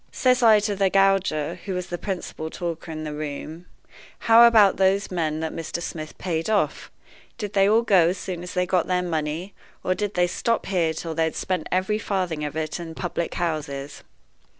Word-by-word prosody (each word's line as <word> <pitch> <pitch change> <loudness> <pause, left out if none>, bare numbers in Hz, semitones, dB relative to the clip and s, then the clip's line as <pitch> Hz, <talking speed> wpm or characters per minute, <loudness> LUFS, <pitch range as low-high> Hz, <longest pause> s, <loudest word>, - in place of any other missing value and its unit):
Says 255 0 +2
I 220 -3 +7
to 205 -1 -1
the 195 -1 +2
gauger, 190 -4 +2
who 195 -2 -3
was 180 0 -3
the 175 - -3
principal 180 -5 -5
talker 165 -1 -5
in 155 0 -5
the 150 -1 -5
room: 155 +3 -6 0.5
'How 235 +1 +7
about 215 -4 +5
those 195 +1 +2
men 160 -3 -1
that 160 - -3
Mr. 165 +1 -4
Smith 155 -2 -6
paid 165 0 -2
off? 215 -2 0 0.5
Did 210 -4 -5
they 195 0 +4
all 225 +2 +4
go 190 -7 +5
as 185 - -2
soon 180 -2 -5
as 180 - -8
they 180 0 +2
got 180 -2 +1
their 180 -1 +1
money, 165 +2 -3 0.3
or 185 - +1
did 205 +2 -3
they 180 0 +3
stop 230 +6 -1
here 175 -4 +1
till 165 0 -4
they 160 0 +1
had 160 - -3
spent 185 -4 -2
every 190 +4 +1
farthing 180 -7 -2
of 150 0 -4
it 155 +1 -3
in 170 -1 -6
the 160 - -9
public 170 -1 -3
houses? 145 -4 -3
180 Hz, 205 wpm, -24 LUFS, 160-195 Hz, 0.5 s, I